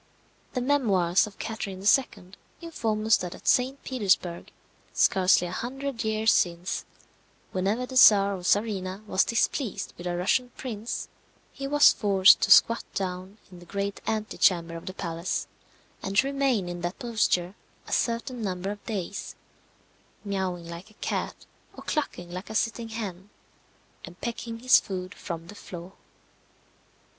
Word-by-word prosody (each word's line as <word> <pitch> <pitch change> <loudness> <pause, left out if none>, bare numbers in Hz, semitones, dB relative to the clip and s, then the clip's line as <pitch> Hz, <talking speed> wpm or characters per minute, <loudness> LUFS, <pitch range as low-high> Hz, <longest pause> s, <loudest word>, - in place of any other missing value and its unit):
The 250 - -1
memoirs 205 -10 +2
of 200 - -13
Catherine 200 -4 -5
II. 205 -5 +2 0.3
inform 225 -11 -2
us 220 0 +5
that 180 -1 -5
at - - -14
St. 260 +2 +2
Petersburg, 195 -8 0 0.4
scarcely 185 -1 +4
a 175 - -5
hundred 260 +4 -4
years 220 0 +2
since, 175 +1 0 0.7
whenever 200 +7 0
the 260 - -9
czar 200 -5 +7
or 185 - -7
czarina 195 -1 0
was 190 -2 +2
displeased 230 0 -1
with 175 - -5
a 175 0 -2
Russian 230 +8 +1
prince, 230 -3 -5 0.5
he 275 -1 -5
was 290 +1 +6
forced 200 -1 +5
to - - +1
squat 230 - +6
down 185 +1 -4
in 180 - -12
the 175 - -14
great 200 +2 -3
antechamber 185 -6 +1
of 165 - -9
the 185 - -6
palace, 170 -1 -3 0.6
and 195 +1 -3
to 265 - +5
remain 270 -8 0
in 175 0 -5
that 175 +2 -3
posture 210 -6 0 0.3
a - - -9
certain 235 +1 -1
number 190 -1 -3
of 205 0 -9
days, 200 -3 -4 0.9
mewing 185 -4 -3
like 170 +5 -9
a 215 - -22
cat, - - -3 0.4
or - - -9
clucking 175 - -3
like 185 +4 -7
a 220 - -6
sitting 230 +1 -1
hen, 200 -4 -6 0.7
and - - -11
pecking 230 -1 -5
his 255 0 +7
food 185 -1 -6
from 165 -3 -6
the 175 - -11
floor. 180 -2 -10
200 Hz, 150 wpm, -27 LUFS, 180-230 Hz, 0.9 s, czar